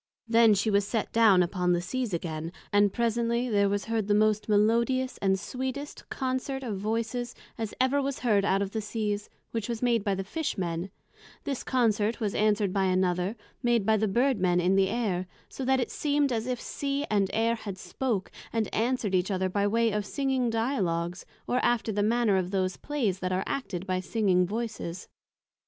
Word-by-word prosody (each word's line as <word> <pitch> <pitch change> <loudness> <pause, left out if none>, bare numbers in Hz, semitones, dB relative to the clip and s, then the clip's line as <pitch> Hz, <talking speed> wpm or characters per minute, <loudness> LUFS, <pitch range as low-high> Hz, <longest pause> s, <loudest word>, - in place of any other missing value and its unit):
Then 230 -2 +6
she 210 +3 +1
was 200 0 +2
set 225 -1 -2
down 215 -5 +6
upon 180 0 0
the 175 - +2
Seas 240 +6 -3
again, 165 -1 -3 0.2
and 205 -1 +5
presently 235 +2 0
there 200 -2 +3
was 205 -1 -1
heard 225 -3 -1
the 205 - +3
most 215 0 +2
melodious 235 +5 +2
and 190 -1 +2
sweetest 260 +6 -5
Consort 265 +1 -2
of 215 -6 -3
Voices, 230 +3 -2 0.2
as 225 -2 -4
ever 260 +2 +3
was 275 -1 -3
heard 210 -5 +3
out 195 0 +2
of 195 - -5
the 220 - -2
Seas, 210 -1 -3 0.2
which 225 -1 -3
was 235 0 -3
made 235 -4 +2
by 200 -1 0
the 195 - -3
Fish 315 - -3
men; 170 0 -2 0.5
this 275 -3 -3
Consort 225 -3 +1
was 210 -4 -1
answered 210 -2 +2
by 195 -1 +2
another, 185 +2 +1 0.3
made 240 -4 +2
by 220 +1 +4
the 215 0 +1
Bird 245 +4 +2
men 180 -1 +2
in 180 +2 +3
the 195 -1 +3
Air, 190 -6 -1 0.2
so 270 - -6
that 265 +1 +2
it 245 - -2
seem'd 290 -2 +1
as 230 0 -1
if 250 -2 -2
Sea 280 +2 -2
and 200 -2 +2
Air 225 +1 +2
had 205 -4 -6
spoke, 220 -1 -3 0.2
and 225 -2 -1
answered 230 -3 0
each 185 +1 +2
other 190 -1 0
by 200 +2 +1
way 230 +2 +2
of 210 0 -1
Singing 265 -3 0
Dialogues, 190 -8 -1 0.2
or 250 - 0
after 235 -2 +1
the 205 0 0
manner 220 -1 +3
of 185 -1 -1
those 185 -1 0
Playes 235 -11 -2
that 185 -1 -2
are 185 +1 0
acted 195 -9 -3
by 185 -1 0
singing 185 -2 +2
Voices. 210 -5 -4
215 Hz, 195 wpm, -28 LUFS, 190-240 Hz, 0.5 s, Then